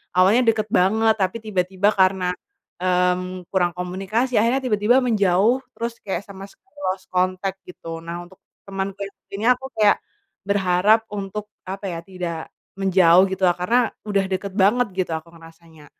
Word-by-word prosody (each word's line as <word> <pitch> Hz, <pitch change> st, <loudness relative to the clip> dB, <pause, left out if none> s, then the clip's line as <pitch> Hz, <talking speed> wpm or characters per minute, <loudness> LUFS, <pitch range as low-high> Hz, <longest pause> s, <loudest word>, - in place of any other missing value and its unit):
awalnya 210 Hz, +7 st, +5 dB
deket 215 Hz, -1 st, -3 dB
banget, 220 Hz, +4 st, +3 dB
tapi 190 Hz, +3 st, 0 dB
tiba-tiba 190 Hz, -1 st, +1 dB
karena, 185 Hz, -1 st, +2 dB, 0.5 s
mmm, 180 Hz, 0 st, 0 dB
kurang 175 Hz, -2 st, +2 dB
komunikasi 195 Hz, +8 st, -2 dB
akhirnya 235 Hz, +5 st, +2 dB
tiba-tiba 220 Hz, +2 st, +3 dB
menjauh, 215 Hz, +1 st, +2 dB
terus 235 Hz, 0 st, -4 dB
kayak 195 Hz, -1 st, -3 dB
sama 195 Hz, -1 st, -9 dB, 0.5 s
lost 190 Hz, 0 st, -8 dB
contact 185 Hz, +1 st, -1 dB
gitu. 165 Hz, -2 st, -8 dB
Nah 170 Hz, +1 st, -6 dB
untuk 185 Hz, +1 st, -19 dB, 0.3 s
temanku 195 Hz, 0 st, -4 dB
yang 200 Hz, -, -12 dB, 0.2 s
ini 210 Hz, +3 st, -3 dB
aku 250 Hz, +1 st, -1 dB
kayak, 210 Hz, -1 st, +5 dB, 0.5 s
berharap 200 Hz, +2 st, +3 dB
untuk, 205 Hz, +1 st, -4 dB, 0.2 s
apa 195 Hz, +2 st, -5 dB
ya, 170 Hz, -3 st, -4 dB
tidak 175 Hz, -3 st, -6 dB, 0.3 s
menjauh 185 Hz, -2 st, +5 dB
gitu 190 Hz, 0 st, 0 dB
lah, 175 Hz, -, +4 dB
karena 225 Hz, +8 st, +2 dB, 0.3 s
udah 200 Hz, -2 st, +1 dB
deket 190 Hz, +1 st, -3 dB
banget 215 Hz, +5 st, +4 dB
gitu 185 Hz, -3 st, -1 dB
aku 160 Hz, +1 st, -5 dB
ngerasanya. 165 Hz, -1 st, -16 dB
190 Hz, 150 wpm, -22 LUFS, 180-210 Hz, 0.5 s, awalnya